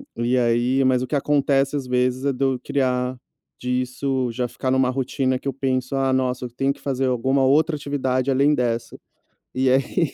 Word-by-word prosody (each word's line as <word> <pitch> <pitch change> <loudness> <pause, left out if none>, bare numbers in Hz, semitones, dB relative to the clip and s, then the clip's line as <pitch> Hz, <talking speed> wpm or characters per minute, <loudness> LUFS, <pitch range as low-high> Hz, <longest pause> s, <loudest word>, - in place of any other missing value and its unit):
e 120 +2 0
aí 120 +2 +2
mas 130 -1 +3
o 130 - -3
que 150 - -2
acontece 140 -1 +1
às 140 -3 -2
vezes, 125 +1 0
é 140 - +2
do 135 0 0
criar 125 -2 -1 0.4
disso 125 +1 -1
já 125 +1 -2
ficar 130 +2 -3
numa 130 -1 +2
rotina 130 0 -1
que 140 - -8
eu 135 - -1
penso: 130 -1 -2
"Ah, 135 -1 +1
nossa! 130 -1 -1
Eu - - -6
tenho 135 +3 -1
que - - -21
fazer 135 -1 -1
alguma 130 +2 +1
outra 155 +4 +3
atividade 135 -2 -1
além 140 +3 +3
dessa". 115 -3 -2 0.6
E 130 0 +1
aí 135 +5 +1
130 Hz, 190 wpm, -22 LUFS, 125-135 Hz, 0.6 s, mas